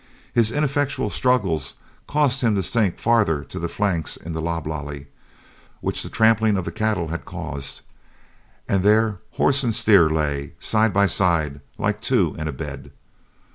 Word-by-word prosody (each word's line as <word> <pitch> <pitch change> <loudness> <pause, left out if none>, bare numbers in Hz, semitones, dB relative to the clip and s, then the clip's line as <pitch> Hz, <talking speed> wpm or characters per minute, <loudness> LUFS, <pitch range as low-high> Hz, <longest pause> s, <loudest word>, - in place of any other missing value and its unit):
His 115 -1 +3
ineffectual 145 0 -1
struggles 100 - +1 0.3
caused 145 -3 +2
him 115 -4 +2
to 95 - 0
sink 105 -2 +1
farther 105 -11 +2
to - - -8
the 85 - -2
flanks 90 -6 -1
in 85 - -8
the 80 - -3
loblolly 75 -3 -4 0.7
which - - -2
the - - -7
tramping 110 -2 +3
of 95 - -3
the 85 - -4
cattle 100 -3 -1
had 85 +1 -4
caused, 70 0 -5 0.9
and 95 - +1
there 105 0 +3
horse 140 +1 +3
and 115 -3 +1
steer 95 -7 +5
lay, 75 -3 -2
side 110 0 +2
by 100 +1 +3
side, 80 -8 +1 0.2
like - - -1
two - - +2
in 75 - -3
a - - -2
bed. 70 -1 -7
95 Hz, 160 wpm, -22 LUFS, 80-110 Hz, 0.9 s, steer